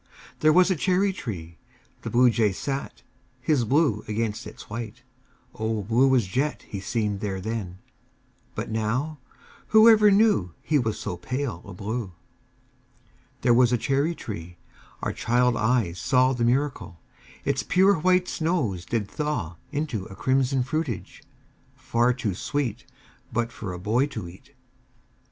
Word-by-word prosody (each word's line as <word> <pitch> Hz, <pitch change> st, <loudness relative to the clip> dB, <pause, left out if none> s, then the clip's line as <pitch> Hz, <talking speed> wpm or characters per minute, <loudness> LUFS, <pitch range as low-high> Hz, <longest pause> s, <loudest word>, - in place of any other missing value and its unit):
There 155 Hz, -, +5 dB
was 185 Hz, +3 st, +5 dB
a -, -, +2 dB
cherry 190 Hz, +4 st, +2 dB
tree. 85 Hz, -, -7 dB, 0.4 s
The -, -, -5 dB
Bluejay 120 Hz, -4 st, +3 dB
sat 135 Hz, +7 st, -5 dB, 0.4 s
His 130 Hz, -1 st, +1 dB
blue 130 Hz, -4 st, +2 dB
against 110 Hz, 0 st, -2 dB
its -, -, -11 dB
white 115 Hz, +2 st, -7 dB, 0.5 s
O 110 Hz, -1 st, -2 dB
blue 125 Hz, +6 st, +3 dB
as 120 Hz, -5 st, +3 dB
jet 135 Hz, +11 st, -1 dB
He 100 Hz, -, -5 dB
seemed 105 Hz, 0 st, -2 dB
there 95 Hz, -2 st, -3 dB
then! 100 Hz, -3 st, -4 dB, 0.8 s
But -, -, -4 dB
now 125 Hz, +8 st, -1 dB, 0.5 s
Whoever 220 Hz, -1 st, +7 dB
knew 200 Hz, -, +3 dB
He 150 Hz, -1 st, +2 dB
was 110 Hz, -4 st, -1 dB
so 90 Hz, -, -4 dB
pale 130 Hz, +7 st, -3 dB
a 100 Hz, -, -8 dB
blue! 105 Hz, 0 st, -4 dB, 1.3 s
There 120 Hz, -, +4 dB
was 125 Hz, 0 st, +5 dB
a 125 Hz, -, +3 dB
cherry 140 Hz, +8 st, 0 dB
tree 90 Hz, -, -7 dB, 0.5 s
our -, -, -1 dB
child 120 Hz, +1 st, +2 dB
eyes 110 Hz, -6 st, +1 dB
saw 130 Hz, 0 st, +3 dB
The 120 Hz, -2 st, 0 dB
miracle: 125 Hz, -, -1 dB, 0.5 s
Its -, -, +1 dB
pure 190 Hz, -1 st, +3 dB
white 180 Hz, +2 st, +3 dB
snows 140 Hz, -, -1 dB
did 110 Hz, -4 st, -1 dB
thaw 110 Hz, -, -3 dB
Into 145 Hz, -10 st, -2 dB
a 95 Hz, -, -11 dB
crimson 130 Hz, +1 st, +1 dB
fruitage, 135 Hz, -, -4 dB, 0.5 s
far 120 Hz, +1 st, +1 dB
too 115 Hz, -5 st, -2 dB
sweet 125 Hz, +2 st, -3 dB, 0.4 s
But 115 Hz, 0 st, -1 dB
for 105 Hz, -4 st, -6 dB
a 90 Hz, -, -5 dB
boy 115 Hz, +9 st, +1 dB
to 110 Hz, -11 st, -6 dB
eat. 85 Hz, +2 st, -15 dB
120 Hz, 145 wpm, -25 LUFS, 105-145 Hz, 1.3 s, Whoever